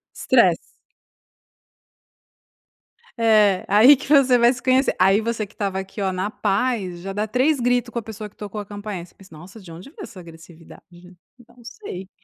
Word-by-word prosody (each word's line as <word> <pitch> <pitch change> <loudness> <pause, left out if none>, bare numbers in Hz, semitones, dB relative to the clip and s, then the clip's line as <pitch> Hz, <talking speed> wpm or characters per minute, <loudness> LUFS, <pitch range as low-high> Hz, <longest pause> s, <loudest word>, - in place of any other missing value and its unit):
estresse. - - +3 2.6
É, 215 -4 +3
aí 230 +8 +7
que 275 - -10
você 270 -4 +4
vai 240 +2 +4
se 245 - -11
conhecer. 260 +1 +2
Aí 195 +3 +4
você 225 -1 -3
que 205 - -21
estava 195 -2 -3
aqui 195 +2 -8
oh 190 -1 0
na 190 +3 -3
paz, 200 -5 -2
já 195 +1 -6
dá 210 +2 -2
3 260 +5 +1
grito 245 0 0
com 235 - -3
a - - -7
pessoa 215 -1 -9
que - - -33
tocou 210 0 -7
a - - -10
campainha 205 -3 -7
e - - -12
você - - -26
pensa: 185 -5 -17
"Nossa, 190 +7 -13
de 175 -3 -13
onde 175 +10 -11
veio 390 +5 -12
essa 200 -5 -11
agressividade? 165 -1 -15 0.6
Eu 240 0 -21
não 240 - -18
sei, 215 - -9
210 Hz, 190 wpm, -21 LUFS, 190-240 Hz, 2.6 s, aí